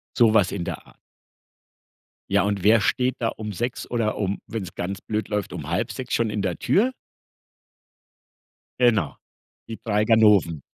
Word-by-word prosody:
So 120 - +6
was 105 -4 +4
in 95 - -3
der - - -6
Art. - - -20 1.3
Ja 100 -1 +3
und 100 -2 -1
wer 110 +1 +5
steht 125 +3 +1
da 115 - 0
um 110 -1 -6
6:00 120 +5 -4
oder 115 -3 0
um, 100 -1 -2
wenn's 100 -6 -5
ganz 95 +3 -4
blöd 110 -1 -3
läuft, 105 -2 -2
5:30 90 - -3
schon 115 -2 +1
in 105 -1 -2
der 95 -3 -2
Tür? 235 +7 +2 1.9
Genau, 110 - +2 0.5
die 115 - -7
3 105 -1 +1
Ganoven. 105 - +4
105 Hz, 150 wpm, -24 LUFS, 95-115 Hz, 1.9 s, So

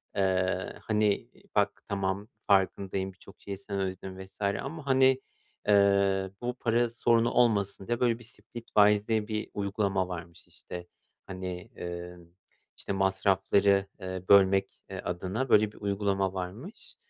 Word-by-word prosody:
eee, 95 -1 +1
hani, 105 +2 +1 0.3
"Bak, 100 0 +1
tamam, 100 +1 -1 0.2
farkındayım; 95 -1 +1
birçok 95 +1 -17
şeyi 100 -1 -6
sen 100 0 -4
ödedin." 95 0 -4
vs. 95 +2 -20
ama 135 +10 -2
hani, 130 0 +4 0.5
eee, 100 -1 +4
bu 125 +1 -2
para 120 +1 +2
sorunu 115 0 +2
olmasın 100 -5 +2
diye 120 0 0
böyle 120 -1 +2
bir, - - -12
Splitwise 105 -3 +1
diye 110 -1 0
bir 110 -1 -3
uygulama 100 -2 0
varmış. 85 -1 -8
İşte, 90 0 -9 0.4
hani, 95 +1 -6
eee, 90 0 -6 0.6
işte, - - -5
masrafları, 95 +1 +3 0.2
eee, 95 0 -5
bölmek, 95 -1 +4
eee, 95 - -5
adına, 95 +9 -3
böyle, 105 -1 +5
bir - - -18
uygulama 100 -1 0
varmış. 105 - -7
100 Hz, 135 wpm, -29 LUFS, 95-110 Hz, 0.6 s, böyle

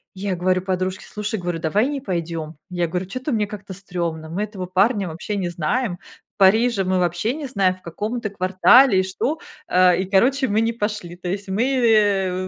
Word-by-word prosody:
Я 190 0 -2
говорю 185 +1 +1
подружке: 185 0 -2
"Слушай". 210 +1 -3
Говорю: 175 -2 -3
"Давай 200 +9 +1
не 290 -1 -3
пойдём". 165 - -4 0.2
Я 175 -1 -1
говорю: 180 +3 -3
"Чё-то 255 +8 -4
мне 215 -4 0
как-то 200 -2 -8
стрёмно, 170 -4 -4
мы 170 +4 -4
этого 200 -4 -6
парня 195 +2 +2
вообще 175 +6 -4
не 185 -3 -1
знаем, 175 +5 -1 0.4
Парижа 215 +2 +4
мы 185 0 0
вообще 175 +6 0
не 300 -2 -5
знаем, 195 -7 +1
в 185 - -22
каком 210 +8 -4
это 225 -3 -3
квартале 195 +5 +5
и - - +2
что", 220 +11 -2 0.3
а, 180 0 +5
и 185 +2 -1
короче, 255 +9 +2
мы 215 +1 +1
не 230 +1 0
пошли. 210 -6 -4
То 180 0 -6
есть 195 +1 -4
мы, 200 +5 +1 0.2
э, 195 -5 +2
190 Hz, 195 wpm, -22 LUFS, 180-215 Hz, 0.4 s, квартале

